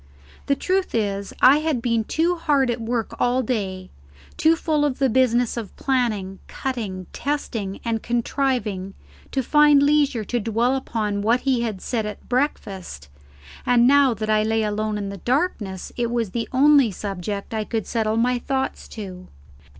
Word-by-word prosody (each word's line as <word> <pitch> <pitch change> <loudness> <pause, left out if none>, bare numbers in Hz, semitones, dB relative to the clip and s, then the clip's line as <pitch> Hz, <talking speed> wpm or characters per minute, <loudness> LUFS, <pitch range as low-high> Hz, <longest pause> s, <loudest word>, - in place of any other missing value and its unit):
The 280 - +3
truth 375 +2 -1
is, 200 -3 -1
I 265 +3 +8
had 310 -4 0
been 230 -2 0
too 335 +7 +1
hard 285 -6 +2
at 235 0 -4
work 230 -1 -2
all 250 +1 +2
day, 195 -6 -3 0.4
too 320 +1 +4
full 310 -2 0
of 285 -3 0
the 270 -3 +2
business 245 -1 +2
of 220 -4 -6
planning, 215 -8 -1
cutting, 215 -8 -4
testing, 230 -9 -3
and 225 -1 -1
contriving, 235 -5 -1 0.4
to 265 - 0
find 295 +1 +5
leisure 285 -5 +2
to 240 +4 -2
dwell 230 +4 +1
upon 215 -6 -2
what 230 +4 +2
he 260 -3 +1
had 215 -5 -3
said 225 -4 -2
at 210 - -8
breakfast, 195 - -3 0.5
and 240 -1 +4
now 275 -2 +5
that 215 +1 -4
I 215 0 +3
lay 220 +1 +1
alone 215 0 -1
in 200 -2 -5
darkness 240 - -1
it 240 -1 -1
was 235 -4 -1
the 230 +1 -3
only 275 -1 +5
subject 200 +1 -5
I 220 -1 -1
could 220 -1 -3
settle 220 -1 -1
my 245 +1 +2
thoughts 265 +1 -3
to. 185 -4 -8
235 Hz, 165 wpm, -23 LUFS, 210-265 Hz, 0.5 s, I